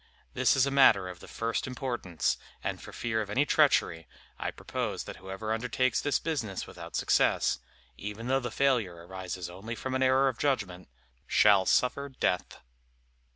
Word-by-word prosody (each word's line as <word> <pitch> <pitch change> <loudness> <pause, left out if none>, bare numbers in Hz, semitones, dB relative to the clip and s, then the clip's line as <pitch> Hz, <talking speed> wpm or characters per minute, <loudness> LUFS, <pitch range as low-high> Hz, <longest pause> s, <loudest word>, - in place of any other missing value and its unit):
This - - +3
is 135 -1 +4
a 140 - -1
matter 110 -9 +5
of 90 -1 -8
the - - -12
first 115 +2 -2
importance, 120 - -2 0.3
and - - -3
for - - -10
fear 110 -2 -1
of 105 - -5
any 130 +8 +2
treachery, 140 - +2 0.3
I - - -2
propose - - -4
that - - -8
whoever 95 +4 -4
undertakes 125 +2 0
this 145 - +1
business 125 - -3
without - - -9
success, - - +2 0.4
even 105 +3 -6
though 135 +2 +2
the 120 -2 -4
failure 110 -11 0
arises 95 -1 -6
only 95 +7 -7
from 130 +3 -4
an 130 - 0
error 130 +1 +4
of 130 -3 -2
judgment, 100 -11 -1 0.4
shall 100 -3 +5
suffer 140 +3 +2
death." 110 -8 -2
115 Hz, 165 wpm, -29 LUFS, 95-130 Hz, 0.4 s, matter